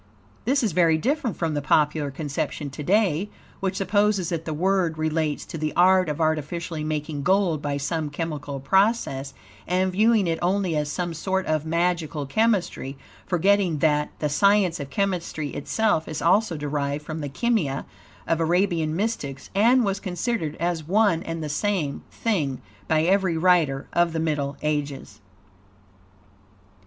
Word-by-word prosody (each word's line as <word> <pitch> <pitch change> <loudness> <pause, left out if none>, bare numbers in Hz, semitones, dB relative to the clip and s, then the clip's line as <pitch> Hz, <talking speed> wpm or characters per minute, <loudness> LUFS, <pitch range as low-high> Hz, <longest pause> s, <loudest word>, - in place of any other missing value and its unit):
This 270 +3 +2
is 215 - +1
very 165 -1 +3
different 255 - -1
from 165 -2 -1
the 145 - -1
popular 150 0 +2
conception 145 0 -4
to 145 - -7
day, 195 +1 +2 0.3
which 190 -1 -2
supposes 200 -1 +1
that 165 -2 -3
the 160 - -3
word 180 0 +1
relates 155 -1 -1
to 165 - -7
the 155 0 -1
art 185 0 +5
of 150 - -3
artificially 160 +1 -1
making 150 -1 -3
gold 180 -2 +2
by 145 -1 -2
some 150 +2 -2
chemical 145 -2 -4
process, 190 - +1 0.3
and 185 +1 +1
viewing 215 +2 +3
it 165 -1 -1
only 185 -1 +1
as 150 -1 -1
some 175 0 -2
sort 190 +4 -1
of 155 0 -1
magical 165 -3 0
chemistry, 180 -6 0 0.3
forgetting 190 -1 +2
that, 150 0 +2
the 150 - -1
science 190 +3 +3
of 140 - -6
chemistry 175 -5 -2
itself 165 +2 0
is 155 - -4
also 180 0 +2
derived 145 0 -2
from 155 0 -5
the 145 - -4
Kimia 160 - 0 0.4
of 165 - +1
Arabian 165 -2 +1
mystics, 170 -10 -3
and 235 +5 +4
was 195 0 -1
considered 180 -4 -2
as 170 -1 -2
one 200 -3 +3
and 165 -1 -5
the - - -3
same 150 -2 -1
thing 155 - -1 0.3
by 155 0 +2
every 185 -1 +2
writer 160 -6 +3
of 175 -1 +2
the 165 - -1
Middle 150 -3 -1
Ages. 145 -5 -3
165 Hz, 155 wpm, -24 LUFS, 150-190 Hz, 0.4 s, art